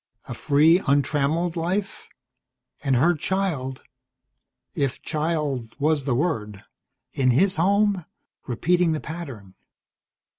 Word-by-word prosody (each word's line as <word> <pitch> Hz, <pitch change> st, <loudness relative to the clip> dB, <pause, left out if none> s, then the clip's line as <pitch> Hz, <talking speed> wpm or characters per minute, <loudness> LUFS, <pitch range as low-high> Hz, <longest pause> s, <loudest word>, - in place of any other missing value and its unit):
A -, -, -5 dB
free, 155 Hz, +5 st, +4 dB
untrammelled 150 Hz, +4 st, +1 dB
life. 185 Hz, +4 st, -3 dB, 0.7 s
And 135 Hz, -2 st, +2 dB
her 155 Hz, +8 st, +4 dB
child 155 Hz, -7 st, -2 dB, 0.9 s
if 140 Hz, -5 st, -1 dB
child 150 Hz, -7 st, -2 dB
was 150 Hz, -1 st, +1 dB
the 130 Hz, -4 st, +1 dB
word 105 Hz, -, -2 dB, 0.5 s
in 130 Hz, -2 st, +2 dB
his 185 Hz, +9 st, +3 dB
home, 200 Hz, +1 st, +2 dB, 0.4 s
repeating 170 Hz, +7 st, +1 dB
the 155 Hz, -, -2 dB
pattern. 135 Hz, -, -8 dB
155 Hz, 105 wpm, -24 LUFS, 135-175 Hz, 0.9 s, free